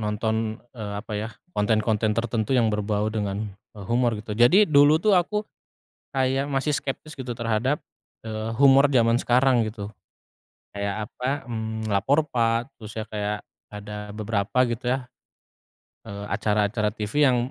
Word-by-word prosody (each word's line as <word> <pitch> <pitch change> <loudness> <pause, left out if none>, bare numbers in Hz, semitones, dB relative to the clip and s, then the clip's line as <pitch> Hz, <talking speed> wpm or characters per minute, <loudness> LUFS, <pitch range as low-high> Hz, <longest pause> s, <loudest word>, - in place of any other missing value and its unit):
nonton, 110 +1 -2
eee, 105 -4 -6
apa 110 - -8
ya, 105 +2 -2 0.2
konten-konten 110 -1 +1
tertentu 115 +2 0
yang 115 -3 +3
berbau 105 0 -1
dengan 105 -1 -3 0.2
e - - -10
humor 120 -1 +2
gitu. 105 0 -6
Jadi 175 - +7
dulu 145 +1 +6
tuh 215 - +4
aku 210 +4 -1 0.7
kayak 135 +1 +1
masih 140 +2 0
skeptis 155 +3 -6
gitu 125 -2 -4
terhadap, 115 +4 0 0.4
eee, 110 0 -4
humor 140 +2 +6
zaman 120 -3 +3
sekarang 125 -2 +3
gitu. 105 -1 -6 0.9
Kayak 100 +2 -3
apa, 130 +1 -3
mmm, 110 -1 -4
Lapor 140 +10 +2
Pak, 115 0 0
terus 110 -1 -10
ya 110 -1 -5
kayak 105 -1 -3 0.3
ada 105 0 -7
beberapa 110 +4 0
gitu 120 +2 -4
ya, 130 -1 -3 1.0
eee, 100 0 -7
acara-acara 105 +1 0
TV 110 +8 +1
yang 125 -3 +4
110 Hz, 145 wpm, -25 LUFS, 105-130 Hz, 1.0 s, Jadi